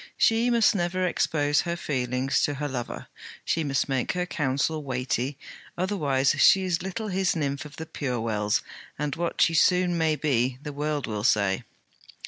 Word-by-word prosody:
She 225 +2 +3
must 235 -3 +4
never 185 -1 0
expose 150 -4 +1
her 170 -1 -2
feelings 130 -2 -1
to 145 - 0
her 145 +1 -3
lover; 125 -4 -5 0.4
she 165 - 0
must 140 -2 0
make 135 -3 -1
her 180 -1 -1
counsel 150 -1 -1
weighty 130 +1 -2 0.4
otherwise 150 -8 +1
she 195 - +6
is 180 -2 0
little 200 +4 -4
his 190 -1 +1
nymph 140 -2 -2
of 150 - -11
the 160 - -6
pure 130 -6 -3
wells, 105 -2 0 0.3
and 150 -1 -2
what 170 0 -2
she 165 - +4
soon 180 +2 +3
may 160 -1 +2
be, 130 -4 0
the 150 - -6
world 150 -1 -2
will 105 -2 -4
say. 100 -5 +2
145 Hz, 170 wpm, -26 LUFS, 130-175 Hz, 0.4 s, she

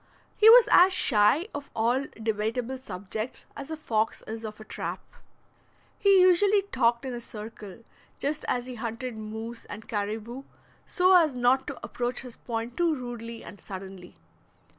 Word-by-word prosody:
He 435 - +7
was 480 +1 +9
as 365 +2 +7
shy 275 - +4
of 285 0 -7
all 240 +5 +1 0.2
debatable 230 +4 -2
subjects 215 +1 -5
as 280 +1 -8
a 315 - -4
fox 225 -7 -1
is 225 +1 -6
of 215 -1 -7
a - - -9
trap. - - -5 1.0
He 395 -2 +5
usually 390 +3 +5
talked 235 -10 +1
in 260 - -4
a 240 - -4
circle, 215 -2 -10 0.3
just 295 +2 -2
as 245 -1 -1
he 255 - -7
hunted 230 +1 -5
moose 220 +2 -7
and 210 +1 -9
caribou, 220 +3 -4 0.5
so 370 +1 +4
as 320 -7 +4
not 250 +2 +2
to 285 - -5
approach 245 0 -3
his 250 -3 -10
point 230 0 -5
too 340 -2 +2
rudely 235 -3 -7
and 200 - -11
suddenly. 190 -2 -9
240 Hz, 160 wpm, -27 LUFS, 220-280 Hz, 1.0 s, was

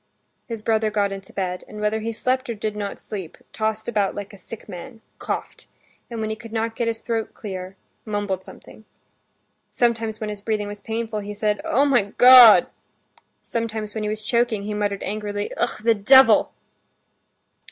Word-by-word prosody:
His 225 -3 -6
brother 220 -1 +1
got 205 -1 0
into 195 -1 -8
bed, 180 -2 -3
and 210 - -9
whether 210 +1 0
he 225 +1 -3
slept 255 +3 -1
or 235 - -2
did 215 0 -3
not 205 -1 -4
sleep, 190 -6 -7 0.2
tossed 220 0 -2
about 205 -4 0
like 205 +1 -7
a - - -11
sick 215 +4 -10
man, 220 +5 -9 0.2
coughed, - - -5 0.4
and 230 -2 -5
when 220 0 -2
he - - -2
could 230 0 -12
not 225 0 -2
get 235 - -1
his 225 0 -2
throat 225 -2 -3
clear, 190 -2 -7 0.3
mumbled 205 -3 -3
something. 220 - -14 0.9
Sometimes 225 -2 0
when 215 -2 -3
his 205 -1 -8
breathing 210 -1 -2
was 205 0 -8
painful, 225 0 -3
he 205 0 -6
said, 210 0 0
"Oh, 275 +4 +2
my 240 -8 +2
God!" 250 -3 +9 0.8
Sometimes 220 -2 -4
when 220 - -4
he 210 - -2
was 215 0 -4
choking 235 -2 +1
he 210 +1 -4
muttered 205 -1 -2
angrily, 205 0 -3
"Ah, - - 0
the 230 0 +5
devil!" 265 +6 +6
215 Hz, 180 wpm, -23 LUFS, 205-230 Hz, 0.9 s, God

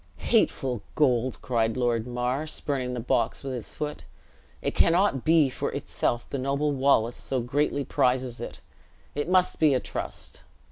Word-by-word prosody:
"Hateful 135 - +2
gold!" 130 -4 +2
cried 115 -2 0
Lord 120 -2 +1
Mar, 125 +5 -1
spurning 130 -5 -2
the - - -3
box 115 +1 0
with 135 -1 -4
his 120 -3 -6
foot; 150 0 -4 0.6
"it - - -2
cannot 170 -6 +3
be 160 -2 +5
for 130 - -3
itself 120 0 -2
the 140 - -4
noble 140 +3 0
Wallace 130 -4 +2
so 130 - -2
greatly 140 +3 0
prizes 125 -1 0
it; - - -7 0.5
it 145 +3 -2
must 185 0 +3
be 150 -4 +5
a - - +2
trust." - - -5
130 Hz, 155 wpm, -27 LUFS, 125-145 Hz, 0.6 s, be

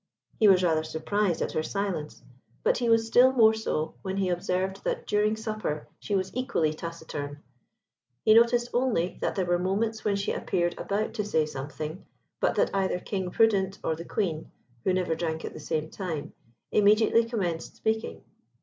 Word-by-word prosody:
He 215 - +6
was 185 -2 +6
rather 160 -3 +2
surprised 170 +4 -1
at - - -3
her 155 - 0
silence, 180 -4 -3 0.4
but - - +2
he 240 -2 0
was 225 0 +4
still 245 +3 +6
more 225 -4 +6
so 160 -8 -2
when 190 0 -3
he 190 -2 +1
observed 185 +2 -1
that - - -2
during 210 +1 +2
supper 215 -8 -4
she 205 - -2
was 190 +1 -2
equally 170 -12 0
taciturn. 155 -3 -6 0.8
He 215 - +7
noticed 235 +1 +4
only 240 -9 0
that - - -1
there 190 - 0
were 175 0 +1
moments 215 +5 -1
when 205 -1 +1
she 200 0 -1
appeared 175 -1 0
about 205 +2 -1
to 215 -2 -2
say 160 -7 +1
something, 150 +4 -6 0.4
but - - +1
that - - +1
either 190 -2 +1
King 190 -1 -3
Prudent 195 -2 +2
or 160 - 0
the 165 - -7
Queen 170 -4 -2 0.3
(who - - +2
never 185 -2 +1
drank 160 -1 -3
at - - -6
the - - -9
same 155 +1 -3
time) 170 -7 -5 0.4
immediately 215 +2 +5
commenced 185 -8 -3
speaking. 220 0 -2
190 Hz, 175 wpm, -27 LUFS, 165-215 Hz, 0.8 s, He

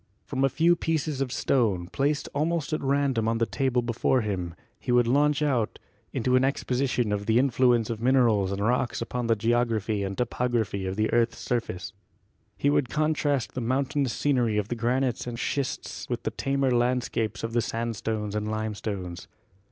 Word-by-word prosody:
From 135 -1 -2
a 135 - +4
few 165 +6 +3
pieces 155 -4 -1
of 130 -2 -1
stone, 105 -12 +1
placed 140 +9 -1
almost 155 +1 -1
at 155 - -1
random 135 -4 +1
on 115 0 +1
the 115 - +2
table 130 -1 0
before 120 +2 +1
him 90 -6 -3 0.2
he 125 - -3
would 120 0 +6
52 120 - +1
GEOLOGY 140 - +5
launch 150 0 +2
out 125 -7 0 0.3
into 125 +2 +1
an 130 - +4
exposition 130 -3 0
of 105 0 -2
the 115 +1 +4
influence 125 -3 +3
of 110 -1 -5
minerals 115 -6 +3
and 100 0 -3
rocks 125 +1 +1
upon 120 0 -3
the 115 - +3
geography 115 -2 0
and 95 0 -3
topography 120 -5 -1
of 95 - -3
the 110 +1 0
earth's 115 0 +2
surface. 115 -7 -3 0.6
He 145 - +2
would 135 -4 +1
contrast 150 -6 0
the 130 - -3
mountainous 135 +2 0
scenery 125 -7 +1
of 105 -1 -1
the 120 - -1
granites 125 +1 0
and 120 -1 -4
schists 135 +2 -3
with - - -3
the - - -1
tamer 135 -1 0
land 125 +1 +2
scapes 110 -6 -3
of 115 0 -3
the 120 - +3
sandstones 110 -2 -3
and 105 0 -2
limestones. 105 -5 -4
120 Hz, 185 wpm, -27 LUFS, 110-135 Hz, 0.6 s, would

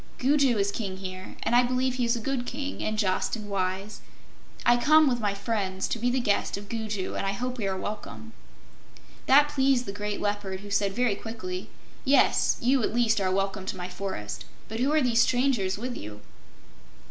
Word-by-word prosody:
Gugu 270 -2 +3
is 200 0 +1
King 195 -3 -4
here, 185 -1 -7
and 240 - +1
I 245 - +7
believe 255 +1 0
he 250 -1 0
is 235 +1 +2
a - - -3
good 245 +1 -2
King 280 +1 -4
and 215 0 -1
just 190 0 +1
and 215 -2 -7
wise. 190 +2 -2 0.6
I 240 - +6
come, 305 +4 +5
with 245 -2 +1
my 205 -3 0
friends, 200 -3 -2
to 230 - -2
be 245 +2 +1
the 255 +1 +1
guest 205 -4 0
of 200 0 -10
Gugu, 215 -4 -3
and - - -2
I 195 0 0
hope 250 +4 -4
we 205 - -1
are 190 -1 -1
welcome." 115 - -6 0.9
That 290 +2 +6
pleased 270 -3 +2
the 195 - -4
great 205 0 -3
Leopard, 205 -2 -2
who 205 0 -10
said 200 -1 +1
very 245 -1 +2
quickly: 200 -4 -6 0.3
"Yes; 280 0 +4
you, 255 +2 +3
at 220 - -1
least, 225 -3 +3
are 190 - +1
welcome 195 0 -1
to 190 - -3
my 180 0 -5
forest. 180 - -5 0.2
But 225 - -5
who 265 +4 +2
are 310 0 +3
these 235 -3 +3
strangers 245 -7 +2
with 245 +3 -4
you?" 105 0 -8
215 Hz, 205 wpm, -27 LUFS, 195-250 Hz, 0.9 s, I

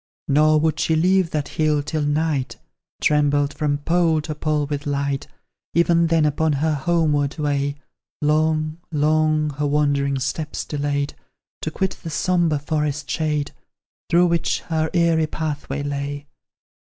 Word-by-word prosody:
Nor 155 +2 +4
would 155 -1 +1
she 160 - +2
leave 185 +2 +3
that 150 -3 -2
hill 150 -2 +1
till 155 +1 -2
night 145 -4 0 0.4
Trembled 145 -1 +2
from 145 -2 0
pole 165 +1 +2
to 155 0 -4
pole 150 -1 -1
with 145 0 -4
light; 140 -1 -1 0.5
Even 170 0 +4
then, 165 -2 +3
upon 150 +1 +1
her 155 +3 +1
homeward 150 -1 +1
way, 145 -2 0 0.4
Long 155 +1 +1
long 155 0 +2
her 145 +1 -2
wandering 140 -1 +1
steps 150 +4 -3
delayed 145 -1 -2 0.5
To - - -2
quit 190 +4 -2
the 165 - -6
sombre 170 0 +1
forest 150 -1 -2
shade, 150 -2 -1 0.6
Through 175 +1 +5
which 170 -1 0
her 160 -1 -1
eerie 165 -2 +3
pathway 150 -2 -4
lay. 145 0 -4
150 Hz, 140 wpm, -22 LUFS, 145-160 Hz, 0.6 s, Through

